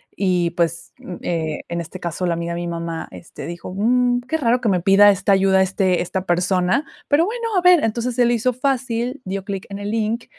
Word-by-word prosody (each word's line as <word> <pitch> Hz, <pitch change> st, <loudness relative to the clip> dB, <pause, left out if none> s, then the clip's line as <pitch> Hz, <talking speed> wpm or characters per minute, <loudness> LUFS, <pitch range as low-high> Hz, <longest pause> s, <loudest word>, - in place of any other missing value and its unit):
y, 180 Hz, -3 st, +1 dB
pues, 170 Hz, -1 st, -2 dB
mm, 180 Hz, -, -8 dB
eh, 160 Hz, -3 st, -2 dB
en 170 Hz, 0 st, -2 dB
este 170 Hz, +3 st, -9 dB
caso, 175 Hz, +1 st, -3 dB
la 170 Hz, -, 0 dB
amiga 170 Hz, 0 st, -3 dB
de 170 Hz, -, -4 dB
mi 175 Hz, -, -4 dB
mamá, 170 Hz, -1 st, -4 dB
este, -, -, -10 dB
dijo: 175 Hz, +1 st, -7 dB
"Mm 245 Hz, +4 st, +2 dB
qué 320 Hz, -, 0 dB
raro 245 Hz, -4 st, +1 dB
que 225 Hz, -, +1 dB
me 185 Hz, -2 st, +2 dB
pida 195 Hz, +3 st, +6 dB
esta 200 Hz, +1 st, 0 dB
ayuda 190 Hz, 0 st, +4 dB
este 190 Hz, -1 st, +1 dB
esta 185 Hz, +1 st, -4 dB
persona 180 Hz, -, +1 dB, 0.2 s
pero, 300 Hz, +3 st, +3 dB
bueno, 460 Hz, +3 st, -3 dB
a -, -, +3 dB
ver", 360 Hz, -2 st, +6 dB
entonces, 235 Hz, +3 st, -1 dB
se 245 Hz, -1 st, +3 dB
le 240 Hz, -, +2 dB
hizo 250 Hz, +2 st, 0 dB
fácil, 255 Hz, 0 st, -2 dB
dio 190 Hz, +1 st, -4 dB
clic 195 Hz, -1 st, -5 dB
en 200 Hz, -, -5 dB
el 205 Hz, 0 st, -4 dB
link 225 Hz, +1 st, -1 dB
195 Hz, 225 wpm, -20 LUFS, 175-245 Hz, 0.2 s, pida